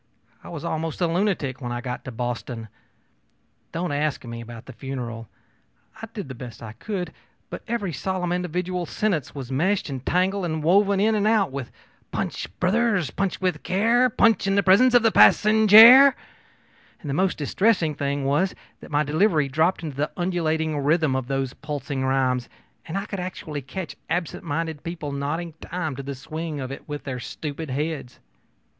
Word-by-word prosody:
I - - -10
was 165 -1 -6
almost 160 -1 -3
a 180 - +2
lunatic 170 -7 -1
when 120 -2 -4
I 120 - -2
got 125 0 -5
to 135 - -5
Boston. 120 -1 -4 1.0
Don't 170 -1 -2
ask 145 -1 -1
me 115 0 -6
about 115 0 -10
the 130 - -10
funeral. 120 -4 -6 0.7
I 225 - -6
did 205 -7 -6
the 130 - -7
best 120 -1 -10
I 110 - -7
could, 180 - -5 0.4
but - - -6
every 210 -7 -2
solemn 185 +1 -2
individual 180 0 -2
sentence 175 - -1
was 135 -2 -6
meshed 180 +4 0
and 130 -2 -5
tangled 190 +4 +1
and 160 -2 -2
woven 200 +4 +4
in 220 +2 +3
and 210 -1 +1
out 215 -7 +3
with 135 -2 -6 0.4
'Punch, - - -3
brothers, 195 - +1
punch 195 -1 -2
with 180 -5 0
care, 230 +6 +3
punch 225 -3 +3
in 195 - +2
the 200 - +3
presence 245 +7 +5
of 240 - +6
the 225 - +4
passenjare.' 220 +7 +8 0.9
And 155 - -9
the 140 - -1
most 185 +5 +1
distressing 170 +1 +1
thing 140 -1 -2
was 150 +8 +1 0.2
that - - -12
my 150 0 +2
delivery 155 0 +2
dropped 160 +6 +1
into 150 -4 -6
the 150 +2 0
undulating 160 -4 0
rhythm 150 -1 +2
of 130 -2 -2
those 135 -1 -2
pulsing 145 -2 -4
rhymes, 130 -2 +1 0.4
and 165 +4 -3
I 200 - -3
could 200 -2 -5
actually 165 -5 -5
catch 160 +7 -6
absent 175 -1 -2
minded 160 -1 -3
people 165 -4 -5
nodding 150 +4 -3
time 160 -6 -4
to 140 - -5
the 140 0 -6
swing 155 +3 -5
of 130 -1 -5
it 135 - -9
with 145 0 -5
their 130 -3 -4
stupid 150 +4 -6
heads. 145 -1 -4
160 Hz, 180 wpm, -24 LUFS, 135-190 Hz, 1.0 s, passenjare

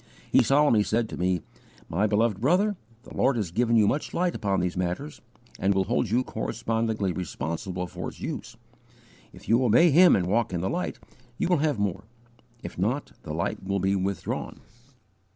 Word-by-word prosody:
He - - +6
solemnly 140 -6 +4
said 110 +2 0
to - - -6
me: 90 -1 0 0.4
"My 100 +6 +1
beloved 105 -1 +1
brother, 185 - +2 0.3
the - - -12
Lord 135 - +2
has 105 -7 -2
given 115 +4 +2
you 110 -2 +5
much 145 - -1
light 180 0 +1
upon 100 -2 0
these 90 0 -1
matters, 90 -4 -3 0.4
and 100 +1 +2
will 95 - +3
hold 120 +2 0
you 120 +4 +2
correspondingly 110 -4 -2
responsible 90 +2 -4
for 90 - -6
its - - -9
use. - - -6 0.7
If - - -15
you 115 +3 +3
obey 125 +9 +5
Him 175 +5 +7
and 90 - +1
walk 105 +2 0
in 85 - -1
the 95 - -1
light, 85 -5 -3 0.4
you - - 0
will 180 - +4
have 150 -3 +1
more; 100 -1 -2 0.6
if 85 - -7
not, 120 +10 -1
the 75 - -6
light 85 +3 -2
will 100 +1 -1
be 95 +1 +1
withdrawn." 95 +1 -3
105 Hz, 185 wpm, -26 LUFS, 90-120 Hz, 0.7 s, Him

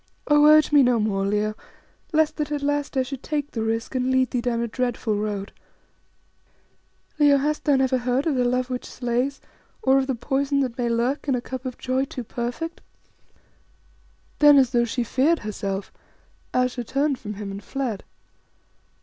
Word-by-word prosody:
"Oh! 295 0 +5
urge 305 0 +6
me 290 -1 +6
no 245 -2 +3
more, 195 -2 0
Leo, 210 +1 0 0.6
lest 315 -1 +2
that 300 -1 -2
at 290 -1 -2
last 290 -1 -1
I 260 - +3
should 265 0 -7
take 295 -2 -3
the 225 - -3
risk 225 +2 -2
and 255 0 0
lead 260 -1 +2
thee 245 - 0
down 235 -1 -1
a 235 - -1
dreadful 240 -2 -1
road. 205 -1 -3 1.7
Leo, 290 -1 +6
hast 300 +2 -1
thou 290 - +4
never 265 -1 +2
heard 250 +3 0
of 320 - +1
the 250 -2 +1
love 250 +1 0
which 250 - -4
slays, 250 +3 -2 0.4
or 265 +1 +4
of 265 - -1
the 265 - 0
poison 275 +3 0
that 250 -3 -2
may 240 -1 -1
lurk 240 +6 -1
in 270 - +2
a - - 0
cup 260 +1 -7
of 250 - -6
joy 260 +1 -1
too 260 -2 -7
perfect?" 245 +9 -5 1.6
Then, 295 -1 +8
as 260 -2 +4
though 240 -1 +2
she 240 +1 -2
feared 275 +8 +2
herself, 195 -2 -4 0.6
Ayesha 250 -1 0
turned 275 +3 0
from 210 0 -6
him 200 -1 -6
and 200 +1 -7
fled. 255 -7 -3
255 Hz, 185 wpm, -24 LUFS, 235-280 Hz, 1.7 s, Then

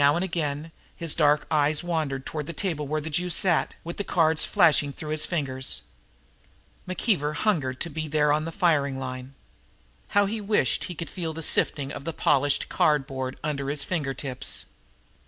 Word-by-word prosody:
Now 145 +1 +5
and 175 +2 0
again 160 -3 -3 0.2
his 165 -2 -1
dark 150 -1 +3
eyes 150 +1 +2
wandered 155 -6 -2
toward 150 -2 -4
the 170 - -5
table 160 -7 -2
where 155 +2 -1
the 160 +2 -6
Jew 180 +4 0
sat, 175 -1 +3
with 170 +1 -6
the 205 - -1
cards 160 -4 +2
flashing 160 -7 +4
through 150 +2 -7
his 155 0 +1
fingers. 135 -6 -1 1.0
McKeever 180 -5 0
hungered 145 -12 0
to 170 - -1
be 155 +1 -4
there 150 -1 +3
on 155 +1 0
the 165 - -4
firing 150 -8 +2
line! 130 0 -6 0.8
How 205 - +6
he 215 +2 -3
wished 205 - +1
he 180 - -6
could 165 +1 -5
feel 165 -4 -4
that 165 +1 -4
sifting 140 -2 +2
of 140 - -7
the 165 - -3
polished 145 -1 +2
cardboard 135 -3 0
under 140 -2 -2
his 145 0 0
finger 150 -7 -2
tips. 130 -1 -2
150 Hz, 180 wpm, -26 LUFS, 140-170 Hz, 1.0 s, How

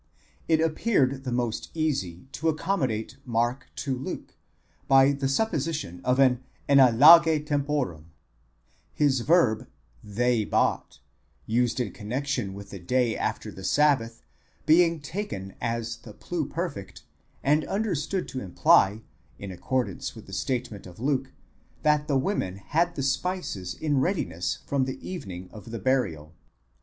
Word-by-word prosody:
It 160 -1 +3
appeared 155 - +1
the 130 - -2
most 120 -2 -2
easy 130 - -2
to 160 +3 -1
accommodate 135 - -1
Mark 120 +1 -1
to 135 -3 -2
Luke 130 +2 -6 0.5
by 135 0 +6
the 140 -1 -1
supposition 150 - -1
of 125 0 +2
an 130 -2 +4 0.3
enadlage 150 +4 +7
temporum; 140 - -1 0.9
his 140 -3 +3
verb 125 -5 +3 0.4
ἠγόρασαν, 105 - -12
they 120 -1 +2
bought, - - 0 0.5
used 120 +2 +1
in 120 -6 -1
connexion 120 -1 -3
with 100 0 -10
the 100 - -7
day 120 +5 +1
after - - -3
the 95 - -11
sabbath, 125 -3 +2 0.4
being 165 +1 +4
taken 145 - -5
as 115 0 -2
the 110 - -12
pluperfect, 160 - -4 0.4
and 150 +3 +3
understood 195 -3 -2
to 130 - -5
imply, 100 +3 +3 0.3
in 100 -1 -7
accordance 130 +7 -2
with 110 - -11
the 95 - -12
statement 120 -3 -3
of 90 +1 -13
Luke, 135 +1 -1 0.5
that 150 -1 +3
the 140 -3 +2
women 130 - -1
had 165 - 0
the 135 - -2
spices 135 - -2
in 145 -3 0
readiness 95 - -1
from 140 -2 0
the 130 0 -4
evening 95 - -6
of 110 +2 -11
the 115 - -5
burial. 95 - -1
130 Hz, 135 wpm, -26 LUFS, 110-150 Hz, 0.9 s, enadlage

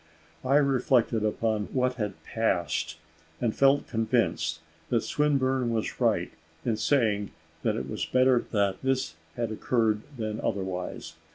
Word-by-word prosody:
I 130 +2 +2
reflected 130 -5 +3
upon 110 0 0
what 130 -1 +2
had 105 -6 -4
passed, 90 -7 -1 0.4
and 115 -3 0
felt 140 +1 +4
convinced 115 0 0 0.3
that - - +2
Swinburne 135 -4 +1
was 115 -2 -2
right - - +2 0.3
in 115 -3 +1
saying 110 -8 +2 0.3
that - - +1
it - - -3
was - - -3
better 130 -1 +4
this 115 +6 0 0.2
had 115 -3 -2
occurred 110 -1 +1 0.2
than 110 -1 -3
otherwise. 95 -3 -3
115 Hz, 125 wpm, -28 LUFS, 105-130 Hz, 0.4 s, felt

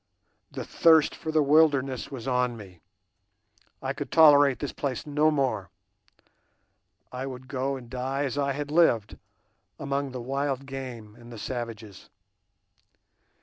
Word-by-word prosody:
The - - -6
thirst 160 -2 +4
for 160 - -5
the 155 -1 +3
wilderness 140 -3 +2
was 130 -3 -8
on 125 -2 0
me; 95 -5 -13 1.0
I - - -2
could - - -7
tolerate 145 -4 +6
this 145 - -4
place 135 -5 -4
no 150 +1 +2
more; 140 -4 -1 1.4
I 130 +1 -5
would 130 -1 -8
go 135 +1 -2
and 125 -3 -10
die 130 +3 -3
as 135 -3 -2
I 140 -1 0
had 145 +1 -5
lived, 120 -11 +2 0.6
among 140 0 -2
the 130 -1 -7
wild 135 +2 -2
game 130 -6 -8
and 120 0 -13
the 115 - -9
savages. 115 -4 -7
135 Hz, 140 wpm, -27 LUFS, 125-145 Hz, 1.4 s, tolerate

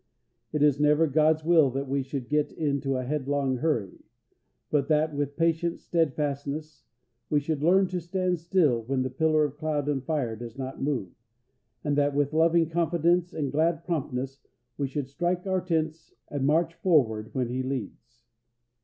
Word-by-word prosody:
It 150 -1 +1
is 145 -2 +4
never 150 +2 +4
God's 155 +1 +2
will 160 -4 +5
that 135 +2 -3
we 140 +1 0
should 135 -2 -5
get 150 +1 +1
into 140 -3 -1
a 130 - -2
headlong 140 -1 -1
hurry; 120 - -1 0.7
but 140 -2 +2
that, 155 0 +2
with 145 0 -2
patient 165 +1 +1
steadfastness, 150 -2 -2 0.5
we 150 - +3
should 145 0 -3
learn 185 +5 +4
to 180 -1 -3
stand 180 +1 -1
still 165 -8 +2
when 130 +3 -1
the 130 - -3
pillar 155 +3 +2
of 145 0 -6
cloud 150 -2 -1
and 140 -3 -1
fire 135 -7 -1
does 120 +2 -9
not 130 0 -6
move, 135 -10 -1 0.7
and 145 -2 0
that 145 0 +1
with 145 0 +1
loving 165 +1 +4
confidence 170 +1 +1
and 150 -5 -3
glad 160 +2 +1
promptness 135 -5 -3 0.4
we 140 +1 -1
should 135 0 -4
strike 175 +6 -2
our 190 -1 0
tents 160 -2 -2
and 140 -2 -1
march 165 +2 +2
forward 115 - +2
when 125 -3 0
He 130 +2 -2
leads. 120 -2 -6
150 Hz, 170 wpm, -27 LUFS, 135-160 Hz, 0.7 s, will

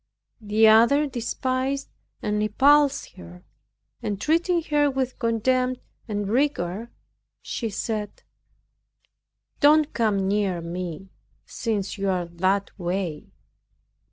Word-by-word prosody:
The 215 +1 +4
other 235 +7 +5
despised 260 +1 -2 0.4
and 210 0 0
repulsed 280 +7 +3
her, 85 +1 -12 0.6
and 205 -2 -3
treating 335 - +1
her 290 -1 +3
with 260 -2 -3
contempt 250 +2 +1 0.3
and 205 -2 -2
rigor, 230 -4 -1 0.5
she 230 - -3
said, 210 0 -4 1.4
"Don't 300 +1 +4
come 205 -4 +1
near 195 -3 0
me, 175 +2 -6 0.3
since 210 -4 -3
you 195 0 0
are 180 -2 0
that 185 +4 0
way." 175 -3 -3
220 Hz, 100 wpm, -24 LUFS, 195-265 Hz, 1.4 s, other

